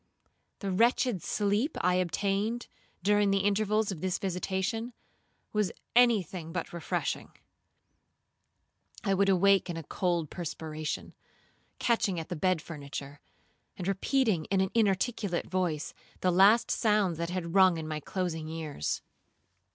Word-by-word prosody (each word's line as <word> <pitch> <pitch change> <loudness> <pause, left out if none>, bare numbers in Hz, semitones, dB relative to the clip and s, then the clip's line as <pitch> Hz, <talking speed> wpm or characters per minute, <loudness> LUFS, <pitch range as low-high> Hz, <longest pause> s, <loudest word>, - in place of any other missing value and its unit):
The 200 -2 -2
wretched 230 0 +2
sleep 210 +8 0
I 180 +1 +3
obtained, 200 +5 0 0.4
during 205 +1 +3
the 195 0 +2
intervals 210 +1 +2
of 170 -5 -6
this 185 -1 0
visitation, 195 +5 -2 0.6
was 210 -4 +1 0.2
any 240 -5 +6
thing 165 -1 -8
but - - -4
refreshing. 170 - -3 1.7
I 195 -3 +2
would 195 +1 +3
awake 195 0 +4
in 170 - -3
a 165 - -5
cold 170 -1 -1
perspiration, 155 -3 -5 0.6
catching 210 -7 +1
at 160 - -7
the 180 - -3
bed 180 0 +1
furniture, 140 -2 -7 0.6
and 180 - -4
repeating 195 - +1
in 195 -1 +1
an 190 0 +1
inarticulate 205 -3 +1
voice, 175 -5 -2 0.3
the 185 - +3
last 200 +6 +5
sounds 210 -6 +2
that 170 0 -2
had 175 -2 -3
rung 185 -3 +6
in 160 -1 -5
my 155 -1 -3
closing 165 -1 -3
ears. 155 - -3
190 Hz, 135 wpm, -30 LUFS, 170-205 Hz, 1.7 s, any